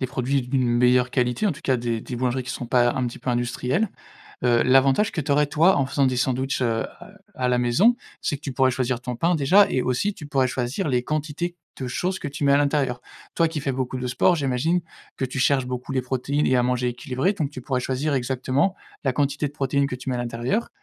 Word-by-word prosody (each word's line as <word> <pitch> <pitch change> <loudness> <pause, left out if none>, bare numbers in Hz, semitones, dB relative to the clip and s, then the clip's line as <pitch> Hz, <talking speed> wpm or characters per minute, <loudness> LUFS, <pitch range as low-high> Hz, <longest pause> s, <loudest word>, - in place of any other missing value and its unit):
des 130 - 0
produits 130 +1 -1
d'une 125 0 0
meilleure 125 +1 +3
qualité, 125 - 0
en 195 - +2
tout 140 - -12
cas, 130 - +2
des 115 -1 -2
des 125 - -6
boulangeries 125 +1 -1
qui 125 - -5
sont 125 - -5
pas, 120 0 +3
un 130 -2 -1
petit 120 - -6
peu 130 - -3
industrielles. 125 - 0 0.6
Heu, 120 -1 +4
l'avantage 135 +9 +4
que 175 - -3
tu 145 - -3
aurais, 150 +1 +4
toi, 165 +6 +4
en 135 - +2
faisant 140 +1 +1
des 130 -1 +1
sandwichs, 130 +1 0
heu, 115 -2 0
à - - -12 0.3
à 125 -1 0
la 125 - +2
maison, 125 - +4 0.3
c'est 145 - -1
que - - -28
tu 140 - -5
pourrais 130 0 +3
choisir 125 -1 -1
ton 125 -1 -4
pain, 170 +6 +2
déjà 180 +8 +5
et 130 - +1
aussi 130 +13 0
tu 155 - -10
pourrais 135 -3 +1
choisir 130 +8 -2
les 125 -2 +1
quantités 155 +4 -3 0.2
de 130 - -3
choses 185 +9 -2
que 150 - -5
tu 145 +1 -5
mets 140 - +4
à - - +6
l'intérieur. 140 -4 +1 0.4
Toi 165 -1 +3
qui 160 -2 -4
fais 140 - -1
beaucoup 130 0 -3
de 125 - -3
sport, 170 +8 +3
j'imagine 145 +5 0 0.4
que - - -3
tu 130 +1 -5
cherches 130 -1 +3
beaucoup 125 +1 -5
les 130 - +1
protéines 130 +3 -1
et 130 - +3
à 125 - +3
manger 125 0 0
équilibré 125 +7 -1
donc 155 -8 -2
tu 130 -3 -8
pourrais 130 0 -1
choisir 135 +4 -1
exactement 130 +7 0 0.3
la 135 - +2
quantité 145 +2 0
de 145 - -11
protéines 140 -1 0
que 130 - -4
tu 130 +1 -6
mets 125 - -1
à - - -2
l'intérieur 120 - -2
130 Hz, 250 wpm, -24 LUFS, 125-145 Hz, 0.6 s, à